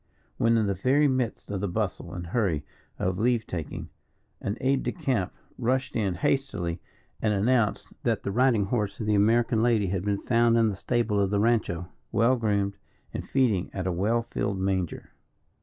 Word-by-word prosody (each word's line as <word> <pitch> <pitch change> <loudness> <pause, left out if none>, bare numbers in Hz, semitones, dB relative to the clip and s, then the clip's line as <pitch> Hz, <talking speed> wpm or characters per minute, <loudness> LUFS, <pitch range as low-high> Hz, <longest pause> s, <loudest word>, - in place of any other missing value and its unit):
When 115 0 +3
in 110 - +2
the 100 - +1
very 130 +10 +3
midst 130 -6 -1
of 100 -2 -2
the 100 - 0
bustle 90 - -3
and 85 -1 -5
hurry 85 -6 0 0.3
of 95 0 -1
leave 120 0 +2
taking, 80 -5 -5 0.5
an 100 +3 -2
aid 135 +1 +2
de - - -1
camp 130 - -1 0.3
rushed 130 +3 0
in 100 -5 0
hastily 90 -7 -1 0.4
and 105 -1 +2
announced 110 +1 +2
that - - 0
the 100 - -2
riding 120 -2 +3
horse 105 -2 -1
of 110 - -3
the 105 - +2
American 115 +3 +3
lady 115 -3 +3
had 95 -1 -1
been 100 -1 -1
found 115 -1 +3
in 115 -1 +4
the 100 - -3
stable 115 0 0
of 100 -1 +2
the 100 0 +1
rancho, 105 -6 +1 0.2
well 120 +3 +4
groomed, 100 -4 0 0.4
and - - -5
feeding 115 -9 +2
at 95 -2 -2
a 95 - +1
well 110 +7 +1
filled 100 -1 -1
manger. 95 -2 -2
105 Hz, 185 wpm, -27 LUFS, 95-120 Hz, 0.5 s, in